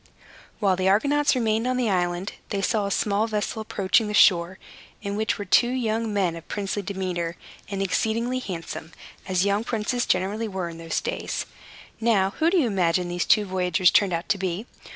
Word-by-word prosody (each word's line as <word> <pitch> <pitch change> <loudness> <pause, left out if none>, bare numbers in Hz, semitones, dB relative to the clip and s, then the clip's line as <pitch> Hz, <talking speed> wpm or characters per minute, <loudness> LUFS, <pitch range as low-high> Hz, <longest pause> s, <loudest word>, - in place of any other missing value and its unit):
While 195 -4 +3
the 185 +1 +2
Argonauts 285 +9 +3
remained 225 -1 +1
on 255 0 0
this 250 -2 +1
island, 175 +1 -1 0.2
they 195 -1 -2
saw 210 -1 +1
a - - -2
small 205 +2 +1
vessel 215 0 -2
approaching 215 +1 +1
the 210 - -2
shore, 180 -2 +5 0.5
in 200 -1 -3
which 220 +1 0
were 205 - -5
two 240 +6 +4
young 230 -3 -1
men 190 -5 0
of 165 - -10
princely 205 0 -3
demeanor, 180 -4 -3 0.3
and 195 0 -2
exceedingly 230 +6 0
handsome, 165 -6 -6 0.3
as 185 0 +1
young 200 +2 +1
princes 235 +1 -1
generally 210 +5 0
were, 190 -4 -4
in 165 0 -10
those 165 -1 -2
days. - - -3 0.5
Now, 210 -4 +2
who 325 +1 +4
do 370 - +2
you 315 - +3
imagine 180 -4 +1
these 175 0 -1
two 210 -2 +4
voyagers 180 -1 +2
turned 200 -2 +3
out 170 +1 -2
to 200 -1 +1
be? 185 +3 -2
200 Hz, 190 wpm, -25 LUFS, 185-220 Hz, 0.5 s, shore